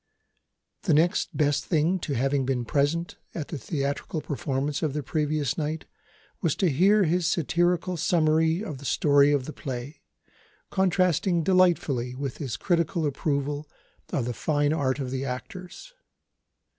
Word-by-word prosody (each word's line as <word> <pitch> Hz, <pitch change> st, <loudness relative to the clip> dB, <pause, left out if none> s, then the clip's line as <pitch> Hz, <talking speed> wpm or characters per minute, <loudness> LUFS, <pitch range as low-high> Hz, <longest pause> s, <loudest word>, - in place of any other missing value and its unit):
The 165 Hz, -7 st, +2 dB
next 165 Hz, +3 st, +1 dB
best 145 Hz, -2 st, +2 dB
thing 170 Hz, +3 st, +1 dB
to 150 Hz, -, -3 dB
having 135 Hz, +3 st, +1 dB
been 130 Hz, -2 st, -1 dB
present, 145 Hz, +7 st, 0 dB, 0.2 s
at 155 Hz, -4 st, -4 dB
the 155 Hz, -, -4 dB
theatrical 140 Hz, +4 st, -3 dB
performance 145 Hz, 0 st, -2 dB
of 155 Hz, -4 st, 0 dB
the 150 Hz, 0 st, -3 dB
previous 150 Hz, -1 st, -1 dB
night, 155 Hz, +1 st, -3 dB, 0.6 s
was 165 Hz, -4 st, +1 dB
to 180 Hz, -4 st, +2 dB
hear 195 Hz, +9 st, +4 dB
his 175 Hz, 0 st, +1 dB
satirical 175 Hz, +2 st, +1 dB
summary 160 Hz, +2 st, +2 dB
of 150 Hz, -11 st, -6 dB
the 140 Hz, -, -11 dB
story 145 Hz, +1 st, +4 dB
of 140 Hz, -3 st, +1 dB
the 155 Hz, -, -6 dB
play, 135 Hz, +2 st, -6 dB, 0.7 s
contrasting 185 Hz, -2 st, +2 dB
delightfully 155 Hz, -9 st, +2 dB
with 135 Hz, -1 st, -4 dB
his 135 Hz, -7 st, -3 dB
critical 170 Hz, -2 st, 0 dB
approval 145 Hz, +1 st, -2 dB, 0.4 s
of 125 Hz, -, 0 dB
the 125 Hz, -, -2 dB
fine 145 Hz, +2 st, +1 dB
art 135 Hz, -4 st, 0 dB
of 130 Hz, -3 st, -4 dB
the 135 Hz, 0 st, -2 dB
actors. 180 Hz, -, -7 dB
150 Hz, 145 wpm, -26 LUFS, 140-170 Hz, 0.7 s, hear